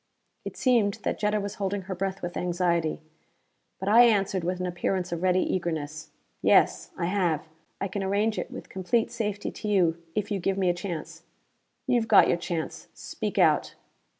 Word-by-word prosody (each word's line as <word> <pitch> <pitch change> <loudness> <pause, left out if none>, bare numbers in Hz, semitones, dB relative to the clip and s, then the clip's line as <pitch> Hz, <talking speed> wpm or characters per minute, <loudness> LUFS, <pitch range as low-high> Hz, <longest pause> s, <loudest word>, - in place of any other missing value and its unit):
It - - -6
seemed 230 -6 +3
that - - -2
Jetta 210 0 +1
was 200 0 -4
holding 195 0 -1
her 190 0 -5
breath 195 +1 -3
with 175 0 -4
anxiety. 170 -3 0 0.8
But 190 - -5
I 225 +4 +7
answered 195 -5 +2
with 180 +1 -2
an 180 - -2
appearance 180 0 -2
of 170 -1 -3
ready 185 0 +3
eagerness. 155 -3 -3 0.3
"Yes. - - +3
I - - -1
have. 175 -5 0 0.3
I 200 - -1
can 200 +1 -4
arrange 205 +3 0
it - - -4
with - - -9
complete 220 +6 0
safety 210 -3 -3
to 215 - -7
you, 175 -5 +2
if 210 0 -2
you 200 - 0
give 190 +2 -1
me 185 -2 +2
a - - -2
chance." 165 -3 -6 0.6
"You've 240 -4 +1
got 215 - +7
your - - +2
chance. 170 -2 -4
Speak - - -5
out." - - +3
190 Hz, 180 wpm, -27 LUFS, 175-205 Hz, 0.8 s, I